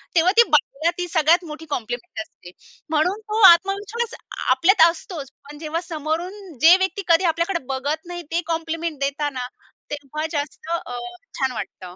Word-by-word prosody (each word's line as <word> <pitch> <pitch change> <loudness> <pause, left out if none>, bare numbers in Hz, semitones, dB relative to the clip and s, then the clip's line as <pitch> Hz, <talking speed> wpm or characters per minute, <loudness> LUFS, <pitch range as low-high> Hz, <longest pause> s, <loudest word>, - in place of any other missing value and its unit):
तेव्हा 345 +2 +5
ती 470 - +9
बाईला 300 +2 +2
ती 355 0 -2
सगळ्यात 330 +1 +3
मोठी 315 0 -8
कॉम्प्लिमेंट 235 -3 -4
असते. 175 -4 -13 0.4
म्हणून 325 +7 +1
तो 435 +1 0
आत्मविश्वास 400 +6 +3 0.4
आपल्यात 330 +11 +4
असतोच. 330 -4 -7 0.2
पण 295 - -10
जेव्हा 320 +1 -3
समोरून 340 +2 -5
जे 335 +3 +9
व्यक्ती 380 +1 -1
कधी 335 +1 +4
आपल्याकडे 335 +2 +1
बघत 285 +5 -2
नाही. 350 0 -6
ते 340 +1 +1
कॉम्प्लिमेंट 330 -1 -3
देतात 285 +1 -1
ना, 250 -1 -4 0.4
तेव्हा 295 +1 -4
जास्त 295 +2 -4
अ, 250 -8 -3 0.4
छान 265 -2 +1
वाटतं. 180 -5 -7
325 Hz, 155 wpm, -22 LUFS, 290-350 Hz, 0.4 s, ती